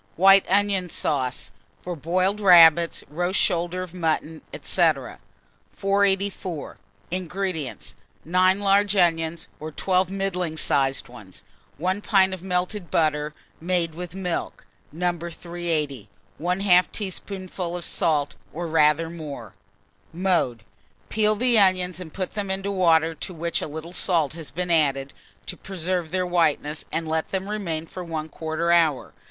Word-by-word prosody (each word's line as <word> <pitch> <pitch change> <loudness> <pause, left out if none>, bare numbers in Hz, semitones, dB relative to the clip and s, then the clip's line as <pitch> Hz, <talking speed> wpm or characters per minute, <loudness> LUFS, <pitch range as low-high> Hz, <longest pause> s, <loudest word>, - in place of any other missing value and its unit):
WHITE 195 +2 +6
ONION 195 -2 +2
SAUCE, 125 -11 -1 0.3
for 175 -1 -4
Boiled 185 +6 0
Rabbits, 170 -3 +6
Roast 175 +6 -1
Shoulder 175 0 0
of 180 -2 -10
Mutton, 160 -2 -2 0.2
&c. - - -2 0.9
484. 195 -4 -1 0.3
INGREDIENTS. 180 -5 -4 0.3
9 185 +3 +3
large 200 0 +3
onions, 165 -2 +1
or 155 - -5
12 185 +3 +1
middling 180 -4 -2
sized 135 -3 +1
ones, 105 -7 -12 0.3
1 185 +6 -1
pint 190 -3 +3
of 185 - -6
melted 180 +1 -2
butter 150 -1 0 0.3
made 170 -1 0
with 175 +1 -7
milk 180 -3 -4 0.3
(No. 175 +3 0
380), 165 - -4 0.3
1/2 180 +1 +3
teaspoonful 185 -3 -5
of 175 - -5
salt, 150 -3 0 0.2
or 170 +2 -4
rather 155 0 +3
more. 145 - -8 0.6
Mode. 170 - 0 0.5
Peel 215 0 +2
the 240 0 +3
onions 185 -2 +2
and 170 -4 -8
put 185 +2 -4
them 205 -2 -4
into 195 +1 -2
water 165 -4 +3
to 180 +3 -7
which 170 +1 -2
a - - -3
little 160 +3 -8
salt 165 -6 +1
has 165 -2 -9
been 180 0 -3
added, 140 -4 +2 0.3
to - - -5
preserve 180 -2 -3
their 185 +2 -1
whiteness, 160 -3 0
and 165 -1 -2
let 160 0 -1
them 190 0 -3
remain 175 -7 -3
for 180 +2 -8
1/4 160 +1 -2
hour. 160 -5 +1
175 Hz, 135 wpm, -24 LUFS, 160-185 Hz, 0.9 s, WHITE